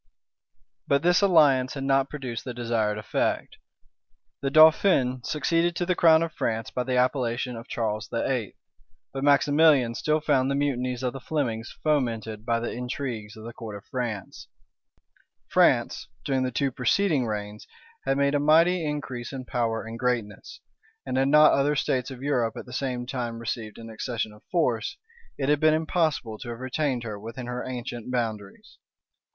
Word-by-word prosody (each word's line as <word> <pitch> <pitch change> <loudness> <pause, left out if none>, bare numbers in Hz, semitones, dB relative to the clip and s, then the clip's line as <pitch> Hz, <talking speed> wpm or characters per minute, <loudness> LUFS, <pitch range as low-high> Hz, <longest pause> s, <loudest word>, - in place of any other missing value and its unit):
But 140 +2 +2
this 175 +2 +4
alliance 145 -9 +4
had 135 - -4
not 135 0 +2
produced 130 -6 -5
the 125 -2 -6
desired 115 -3 0
effect. 105 - -2 0.8
The 135 - 0
dauphin 155 -4 +5
succeeded 165 +5 0
to 175 - -1
the 180 - +2
crown 165 -2 +5
of 165 -1 -4
France 115 -5 -2
by 125 - -2
the 130 0 0
appellation 125 -1 0
of 115 +1 -9
Charles 110 -2 -2
VIII.; 115 -1 -2 0.6
but 135 0 -4
Maximilian 145 -3 +4
still 155 +5 0
found 140 -4 +2
the 140 - 0
mutinies 130 -3 -1
of 125 - -1
the 135 - -6
Flemings 125 -5 -3
fomented 115 -7 -1
by 115 -1 +2
the 120 - -3
intrigues 120 -4 -5
of 110 - -10
the 115 +1 -8
court 110 -3 -8
of 100 - -10
France. 120 -7 -4 1.0
France, - - +2 0.2
during 135 -2 +1
the 130 - 0
two 135 +2 -1
preceding 135 +2 +1
reigns, 105 0 -5 0.4
had 135 - 0
made 140 0 +2
a 145 - +2
mighty 165 +4 +4
increase 135 -5 -4
in 130 -2 -6
power 115 -3 -1
and 115 +1 -7
greatness; 125 - -3 0.4
and - - -3
had 135 +1 +2
not 150 +2 +7
other 145 +2 +2
states 130 -2 0
of 130 -1 -9
Europe 125 -6 0
at - - -7
the 125 - -11
same 125 -2 -2
time 120 -2 -4
received 115 -2 -5
an 115 -1 -9
accession 110 -1 -3
of 105 - -17
force, 125 -11 0 0.4
it 135 - -1
had 150 0 +3
been 155 0 +4
impossible 155 - -1
to 125 - -7
have 120 0 -6
retained 130 -1 -1
her 105 -3 -6
within 115 +4 -7
her 125 0 -4
ancient 120 -2 -6
boundaries. 110 -5 -4
125 Hz, 170 wpm, -26 LUFS, 115-145 Hz, 1.0 s, not